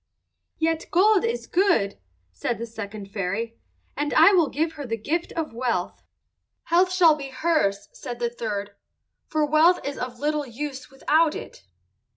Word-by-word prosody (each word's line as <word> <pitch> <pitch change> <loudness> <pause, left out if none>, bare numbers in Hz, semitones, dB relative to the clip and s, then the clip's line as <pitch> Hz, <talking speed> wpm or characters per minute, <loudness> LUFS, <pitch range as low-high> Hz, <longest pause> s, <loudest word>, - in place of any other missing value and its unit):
"Yet 325 0 0
gold 400 +3 +4
is 465 +1 -2
good," 340 - +1 0.3
said 90 - -3
the 230 - -4
second 210 -3 -8
fairy, 215 +4 -3 0.4
"and 290 0 -2
I 330 +6 +7
will 340 -6 +4
give 320 +3 -1
her 295 -3 -7
the 225 -1 -2
gift 325 +10 -2
of 320 -6 -3
wealth." 230 -7 -2 0.6
"Health 360 +2 +3
shall 355 -4 +6
be 285 -2 -6
hers," 260 -9 0
said 240 -1 -7
the 240 -1 -1
third, 205 -4 -4 0.6
"for 310 -1 +1
wealth 310 +4 +4
is 280 0 -4
of 250 -1 -5
little 295 -1 -1
use 270 +3 -6
without 300 +3 +2
it." - - -9
285 Hz, 160 wpm, -24 LUFS, 230-325 Hz, 0.6 s, I